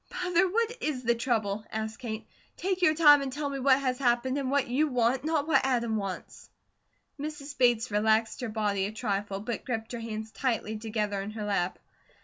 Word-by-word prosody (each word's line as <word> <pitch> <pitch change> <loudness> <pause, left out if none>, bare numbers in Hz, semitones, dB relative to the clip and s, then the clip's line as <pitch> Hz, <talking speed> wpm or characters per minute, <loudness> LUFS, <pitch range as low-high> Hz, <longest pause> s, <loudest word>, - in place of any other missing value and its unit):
"Mother, 360 +1 +3
what 465 +4 0
is 275 -5 -2
the 235 0 +3
trouble?" 220 -4 -1
asked 220 0 -4
Kate. 220 -4 -5 0.3
"Take 375 0 -1
your 310 -3 +4
time 295 -3 +7
and 270 -1 -3
tell 285 +1 -3
me 275 - -3
what 260 0 +5
has 255 -2 -1
happened, 255 +1 +1
and 265 -2 -2
what 280 0 +1
YOU 275 +6 +2
want, 250 0 +1
not 310 -1 0
what 280 -4 +4
Adam 235 -4 +1
wants." 195 -3 -5 0.7
Mrs. 290 -1 -6
Bates 240 -3 +3
relaxed 220 +2 +2
her 245 - -3
body 205 -3 0
a - - -5
trifle, 200 -3 -2
but 230 0 -4
gripped 225 -3 -4
her 240 - -4
hands 220 -1 -5
tightly 230 -4 -1
together 210 -2 -2
in 200 - -5
her 215 -1 -5
lap. 190 -3 0
240 Hz, 195 wpm, -29 LUFS, 215-280 Hz, 0.7 s, time